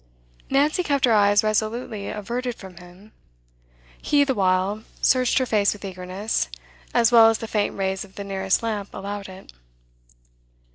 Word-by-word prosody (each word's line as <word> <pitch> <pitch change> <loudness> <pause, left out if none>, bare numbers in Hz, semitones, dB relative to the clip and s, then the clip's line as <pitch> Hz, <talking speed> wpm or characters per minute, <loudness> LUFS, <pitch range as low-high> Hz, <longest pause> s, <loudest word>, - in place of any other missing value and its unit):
Nancy 290 +6 +2
kept 285 -6 +1
her 235 - +3
eyes 205 0 +4
resolutely 215 0 -2
averted 240 +4 -4
from 190 -5 -12
him; 180 +4 -15 0.9
he, 290 -1 +3
the 275 -2 0
while, 190 0 +1 0.2
searched 255 -2 +2
her 260 - +2
face 210 -4 +2
with 205 -1 -10
eagerness, 185 - -3 0.4
as 235 0 +3
well 225 -2 +8
as 225 - +1
the 225 - -7
faint 210 -2 -1
rays 190 -1 -2
of 195 -1 -16
the 200 - -6
nearest 195 +1 -1
lamp 210 -3 -3
allowed 200 0 -6
it. 190 +1 -13
210 Hz, 155 wpm, -23 LUFS, 195-235 Hz, 0.9 s, well